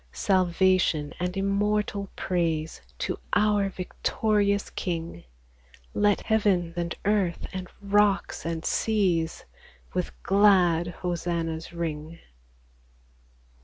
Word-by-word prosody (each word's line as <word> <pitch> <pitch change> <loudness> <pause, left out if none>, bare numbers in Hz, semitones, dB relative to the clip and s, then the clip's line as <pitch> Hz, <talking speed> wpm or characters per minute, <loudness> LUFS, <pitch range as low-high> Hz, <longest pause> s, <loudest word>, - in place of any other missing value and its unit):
Salvation 185 -5 +2
and 180 +1 -2
immortal 200 0 0
praise 165 - -1 0.2
To - - -3 0.2
our 205 -2 +3
victorious 200 +2 0
King! 165 - -4 0.7
Let 205 -1 +2
heaven 200 -6 +1
and 170 -1 -2
earth, 200 -4 +1
and 185 -1 -5
rocks 205 0 +2
and 165 -1 -3
seas, 180 -7 0 0.5
With 180 -1 -1
glad 185 -4 +4
hosannas 170 -2 -3
ring 165 -1 -4
185 Hz, 90 wpm, -26 LUFS, 170-200 Hz, 0.7 s, glad